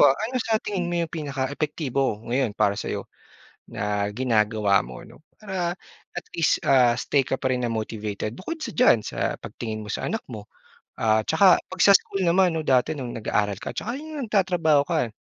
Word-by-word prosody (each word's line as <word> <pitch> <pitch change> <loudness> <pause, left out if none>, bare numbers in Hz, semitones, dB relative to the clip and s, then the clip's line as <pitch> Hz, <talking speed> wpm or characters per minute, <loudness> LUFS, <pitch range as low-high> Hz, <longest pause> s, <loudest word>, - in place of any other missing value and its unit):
ah, 135 - +6
ano 245 +4 -2
sa 225 -1 +1
tingin 190 -5 -3
mo 175 - -1
yung 160 - -12
pinaka-epektibo 140 -4 -2
ngayon 125 -5 0
para 105 -2 +3
sa 100 - -5
'yo - - -3 0.6
na 105 0 -2
ginagawa 110 -5 +2
mo 65 +1 -9
'no? - - -16 0.2
Para 185 -4 -3 0.4
at - - -5
least, 165 -2 +2
ah, 125 -3 +4
stay 140 - +1
ka 135 0 -1
pa 130 - -1
rin 125 - -1
na 120 - -1
motivated 110 -2 -4
bukod 310 - -6
sa - - -5
diyan 125 - +4
sa - - -2
pagtingin 110 -2 -6
mo 105 - -5
sa - - -3
anak 225 - -3
mo, 105 -2 -8 0.5
ah, 110 -1 +3
'tsaka 180 +3 +5
'pag 185 -1 -10
sa 200 +1 +8
school 195 - -6
naman 180 +1 +4
'no, 160 - -1
dati 135 0 +2
nung 130 -5 -5
nag-aaral 105 -2 0
ka, - - -6
'tsaka 235 +4 -4
yung 310 +1 -7
nagtatrabaho 175 -8 +3
ka? 120 -5 -1
135 Hz, 195 wpm, -24 LUFS, 110-180 Hz, 0.6 s, sa